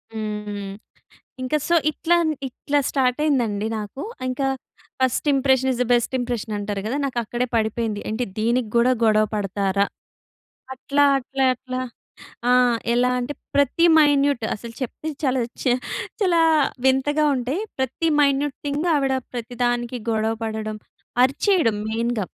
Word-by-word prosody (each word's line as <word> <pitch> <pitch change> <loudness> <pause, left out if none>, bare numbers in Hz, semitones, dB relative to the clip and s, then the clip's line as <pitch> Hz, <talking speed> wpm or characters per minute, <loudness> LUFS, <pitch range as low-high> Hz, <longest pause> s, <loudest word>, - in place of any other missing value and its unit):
హ్మ్. 215 -1 -3
హ్మ్. 200 -1 -5 0.7
ఇంక 255 +4 -1
సో, 345 - +3 0.2
ఇట్లా 335 +3 +1
అని, 315 - +1
ఇట్లా 285 +3 -1
స్టార్ట్ 255 -1 +1
అయింది 280 -5 +3
అండి 205 0 -2
నాకు. 210 +5 -6 0.3
ఇంక 255 +2 -3 0.6
first 260 +3 +1
impression 265 -1 +3
is 245 - -3
the - - -5
best 240 +1 +1
impression 240 -3 -3
అంటారు 205 -1 -3
గదా! 240 +6 -1
నాకు 260 -3 -4
అక్కడే 240 +3 -2
పడిపోయింది. 220 -1 0
ఏంటి 225 +3 -1
దీనికి 235 +1 +1
కూడా 240 +2 +4
గొడవ 215 -1 +4
పడతారా? 200 -1 0 0.9
అట్లా, 280 +2 0 0.2
అట్లా, 270 +1 -2
అట్లా 255 0 -5 0.7
ఆహ్, 250 -1 +4 0.2
ఎలా 245 +1 +3
అంటే 250 +4 -3 0.2
ప్రతి 285 +4 +3
మైన్యూట్ 285 -5 +4
అసలు 230 +2 -9
చెప్తే 265 +5 -5
చాలా 260 -2 +1 0.2
చా- 250 - +3 0.5
చాలా 355 -5 +3 0.4
వింతగా 270 +3 +3
ఉంటాయి. 260 +7 -2 0.2
ప్రతి 265 +5 -1
మైన్యూట్ 280 0 +2
థింగ్ 290 +4 -1
ఆవిడ 275 -2 +1 0.2
ప్రతి 245 0 -6
దానికి 240 0 -1
గొడవ 220 0 +1
పడడం, 220 -1 -3 0.5
అరిచేయడం 275 - +2
మెయిన్‌గా. 230 -1 -1
250 Hz, 140 wpm, -22 LUFS, 220-275 Hz, 0.9 s, కూడా